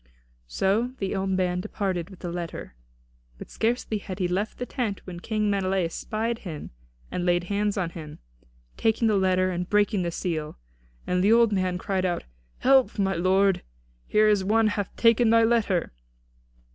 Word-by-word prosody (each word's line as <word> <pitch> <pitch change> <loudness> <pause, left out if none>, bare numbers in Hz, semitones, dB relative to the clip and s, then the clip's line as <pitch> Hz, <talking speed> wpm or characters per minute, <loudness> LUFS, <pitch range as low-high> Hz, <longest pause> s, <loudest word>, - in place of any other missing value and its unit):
So 210 - 0
the 195 0 -2
old 190 0 -1
man 180 -1 0
departed 190 -4 -3
with 190 - -14
the 175 - -4
letter. 170 - -6 0.6
But - - -11
scarcely 225 -2 -1
had 190 -2 -7
he 185 -3 0
left 195 +5 -2
the 250 - -3
tent 225 -6 -3
when 175 -2 -7
King 215 +2 -1
Menelaus 190 -4 0
spied 225 +2 -2
him 160 -6 -7 0.4
and 180 - -2
laid 175 0 +2
hands 205 +2 -1
on 175 -3 -1
him, 155 -3 -9 0.6
taking 225 +1 +2
the 215 - +3
letter 185 -1 +2
and 180 0 -3
breaking 205 -1 +2
the 175 - -1
seal. 165 -3 -3 0.5
And 180 0 +1
the 205 - +4
old 230 -1 +5
man 185 -2 0
cried 190 0 -2
out: 175 -2 -1 0.3
"Help, 265 -2 +3
my 195 -1 +1
lord; 190 +2 +2 0.5
here 215 0 +4
is 205 -2 +3
one 215 +2 +3
hath 205 -1 -2
taken 230 0 +4
thy 230 0 +5
letter!" 225 - +1
195 Hz, 170 wpm, -26 LUFS, 180-215 Hz, 0.6 s, old